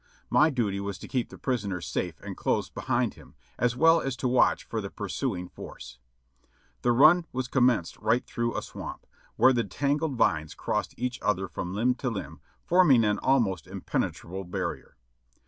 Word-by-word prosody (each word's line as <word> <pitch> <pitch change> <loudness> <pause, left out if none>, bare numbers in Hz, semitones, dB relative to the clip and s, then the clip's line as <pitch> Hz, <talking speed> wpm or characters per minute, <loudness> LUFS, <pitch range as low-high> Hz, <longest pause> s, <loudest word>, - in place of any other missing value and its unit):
My 155 - +5
duty 110 -8 -1
was 100 -1 -4
to - - -10
keep 125 -3 -1
the - - -11
prisoners 100 - -2
safe 80 +1 -3
and - - -6
close - - -1
behind - - 0
him, - - -17 0.2
as 120 +1 +2
well 165 +5 +5
as 135 -2 -2
to 130 - -1
watch 125 0 +3
for 110 - -4
the 100 - -5
pursuing 100 -2 -3
force. 65 -6 -11 0.8
The 120 - +3
run 155 +8 +6
was 130 0 -2
commenced 125 -9 +2
right 115 +3 +1
through 115 -1 -2
a - - -2
swamp, - - -8 0.3
where 130 - +6
the 120 -1 +1
tangled 140 - -1
vines 80 -9 +1
crossed - - -2
each 125 +2 -3
other 95 -2 0
from 90 +1 -5
limb 120 +4 +2
to 130 - 0
limb, 105 -5 -6 0.2
forming 170 -10 +5
an 105 -1 +1
almost 100 - +1
impenetrable 95 0 -3
barrier. 90 - -5
115 Hz, 175 wpm, -28 LUFS, 95-130 Hz, 0.8 s, run